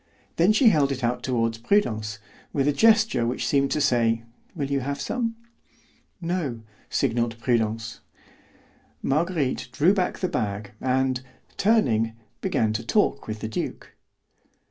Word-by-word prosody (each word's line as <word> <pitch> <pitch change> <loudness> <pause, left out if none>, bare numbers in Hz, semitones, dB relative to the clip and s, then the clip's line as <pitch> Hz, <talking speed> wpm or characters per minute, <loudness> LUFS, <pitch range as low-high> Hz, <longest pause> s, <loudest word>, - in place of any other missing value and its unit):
Then 175 +5 +5
she 225 +2 +6
held 145 -7 +3
it 130 -1 -4
out 120 +1 0
toward 115 -3 -1
Prudence, 110 - +1 0.4
with 140 -1 +1
a 145 - +3
gesture 220 - +4
which 125 - -2
seemed 140 -1 +2
to - - 0
say, 115 -4 +2 0.3
"Will 145 -4 -2
you 140 - +2
have 140 +2 -3
some?" 230 -2 -2 0.8
"No," 165 -9 -2 0.3
signalled 120 -3 0
Prudence. 115 -1 -1 1.0
Marguerite 150 -3 0
drew 160 +9 +4
back 185 -3 0
the 185 - -1
bag, 100 - -3
and, 130 0 +1 0.3
turning, 120 - +2 0.3
began 110 -1 +1
to 110 - -3
talk 140 - +1
with 110 -1 -5
the - - -2
duke. 110 - -5
130 Hz, 140 wpm, -25 LUFS, 115-170 Hz, 1.0 s, she